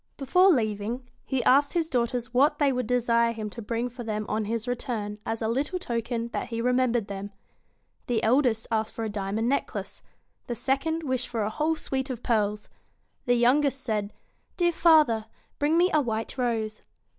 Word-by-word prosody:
Before 360 +8 +4
leaving, 230 - 0 0.2
he 265 -2 -1
asked 280 +2 +4
his 335 -3 +1
daughters 245 -2 -1
what 275 +4 +4
they 280 -2 +3
would 250 -3 -2
desire 235 -1 +2
him 215 -2 -5
to 235 - -8
bring 230 +3 -2
for 245 0 -8
them 215 -1 -3
on 215 0 -1
his 230 +2 -3
return, 220 -4 -3
as 225 0 -2
a - - +1
little 275 +10 -1
token 235 -6 -3
that - - -3
he 230 -1 -4
remembered 245 -2 +2
them. 200 0 -5 0.8
The 235 -3 0
eldest 235 -1 +3
asked 220 -1 0
for 225 - -3
a - - -2
diamond 205 +2 -2
necklace. 280 +3 -2 0.5
The 240 - -3
second 275 +7 -1
wished 255 -3 -1
for 225 -3 -2
a 210 - -2
whole 310 +6 0
suite 265 -3 -3
of 250 -2 -5
pearls. 210 -2 0 0.6
The 245 - +4
youngest 270 +3 +3
said, 210 -5 -2 0.5
'Dear 350 -1 +3
father, 305 -10 +4 0.3
bring 300 +3 +2
me 360 +2 +4
a 305 - +4
white 225 -3 -3
rose.' 225 -4 -1
240 Hz, 180 wpm, -27 LUFS, 220-270 Hz, 0.8 s, Before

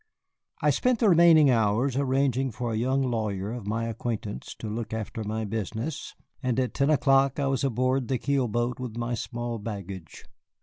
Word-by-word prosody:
I - - +5
spent 250 -1 +2
the 220 -2 +3
remaining 165 -5 +7
hours 115 +3 +2
arranging 135 -1 +1
with 115 - -9
a - - -1
young 130 +4 +1
lawyer 110 -5 -2
of 120 -4 -6
my 115 +2 -1
acquaintance 115 -2 -4
to 110 - -7
look 110 +1 -4
after 110 0 -4
my 110 +1 -3
business, 110 - -4 0.3
and 125 -2 0
at 130 -1 -1
ten 140 +1 +1
o'clock 135 -1 +3
I 140 - +1
was 135 -1 0
aboard 130 0 +1
the 130 - 0
keel 135 0 0
boat 120 +2 -1
with 120 -3 -5
my 120 +1 -2
small 120 0 -4
baggage. 100 -5 -7
120 Hz, 180 wpm, -27 LUFS, 110-135 Hz, 0.3 s, remaining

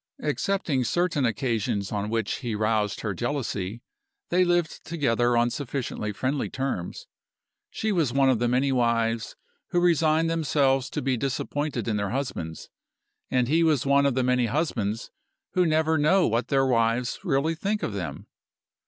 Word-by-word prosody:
Excepting 150 -2 0
certain 165 0 +1
occasions 110 -3 -1
on 105 0 -2
which 115 -2 -1
he 120 -4 -3
roused 110 -1 0
her 105 -3 -2
jealousy, 115 -2 -3 0.5
they 180 +1 +4
lived 175 -2 0
together 120 -7 +1
on 120 +1 +2
sufficiently 125 -6 -3
friendly 130 +6 -2
terms. 130 -10 -4 0.6
She 220 - -2
was 165 -10 +1
one 135 +1 +3
of 130 -4 +3
the 120 - +1
many 130 +3 +2
wives 115 -2 0 0.3
who 175 - +1
resign 165 -2 +3
themselves 140 -5 +1
to - - -4
be 130 -1 +1
disappointed 135 0 -2
in 110 -2 0
their 100 -1 -1
husbands 110 - -4 0.6
and 125 -2 +1
he 160 +5 +3
was 155 -6 +2
one 140 0 +4
of 135 - 0
the 130 - +1
many 125 -1 +2
husbands 115 -6 -2 0.4
who 180 -2 +2
never 160 0 +2
know 175 +5 +4
what 115 +2 0
their 135 -1 +2
wives 120 -1 +1
really 160 -2 +1
think 200 +6 -2
of - - -2
them. 85 -8 -5
130 Hz, 160 wpm, -26 LUFS, 115-155 Hz, 0.6 s, they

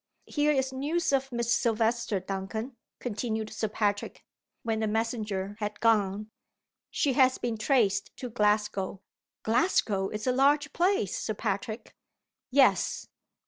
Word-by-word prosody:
Here 295 0 +1
is 265 -2 0
news 295 +5 0
of 270 0 +1
Miss 235 -1 -1
Silvester, 230 -2 +1
Duncan," 195 +6 -5 0.2
continued 220 -2 -3
Sir 220 +1 -1
Patrick, 205 -1 -2 0.4
when 225 -1 -1
the 220 - 0
messenger 215 -3 -2
had 210 -1 -4
gone. 210 -2 +2 0.6
"She 280 -4 +1
has 260 0 +4
been 235 -2 -2
traced 215 -4 +2
to 250 -2 -6
Glasgow." 210 -3 0 0.4
"Glasgow 220 - +2
is 215 0 -5
a 255 - +3
large 290 +3 +3
place, 350 - +1
Sir 215 - -3
Patrick." 220 +2 -4 0.5
"Yes. 270 +1 +3
225 Hz, 130 wpm, -28 LUFS, 210-260 Hz, 0.6 s, has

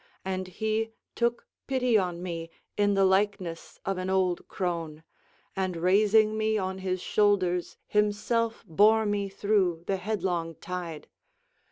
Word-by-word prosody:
And 185 -1 -2
he 220 +4 -2 0.2
took 235 0 0 0.2
pity 250 -3 +2
on 180 -4 +1
me 165 -2 -4 0.3
in 205 -1 +2
the 195 0 +4
likeness 190 -3 0
of 195 -1 -1
an 185 0 -3
old 185 -2 +1
crone, 165 -4 -3 0.5
and 185 -2 -1
raising 210 +5 +4
me 220 0 +1
on 190 -1 -2
his 185 -1 -2
shoulders 185 -4 +1
himself 215 +2 0
bore 215 +6 +4
me 205 -1 -1
through 190 -4 +1
the 195 - 0
headlong 180 -5 -2
tide. 175 -3 -6
190 Hz, 135 wpm, -28 LUFS, 180-215 Hz, 0.5 s, the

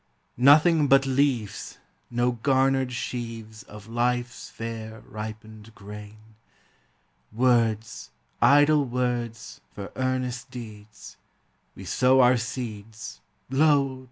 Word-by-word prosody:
Nothing 150 +3 +6
but 135 0 +5
leaves; 130 -6 -1 0.3
no 120 +1 +1
garnered 130 +1 +1
sheaves 115 -3 -6
Of 105 -1 -13
life's 120 +1 -2
fair, 110 -1 -7
ripened 110 0 -9
grain; 105 0 -10 1.1
Words, 115 -2 +1 0.3
idle 145 +1 +5
words, 120 -3 -3
for 100 -1 -7
earnest 130 -1 -2
deeds; 105 -3 -11 0.6
We - - -10
sow 130 +1 +3
our 125 0 +5
seeds, 110 - -6
— - - -44
lo! 140 -2 +3
120 Hz, 100 wpm, -25 LUFS, 110-130 Hz, 1.1 s, Nothing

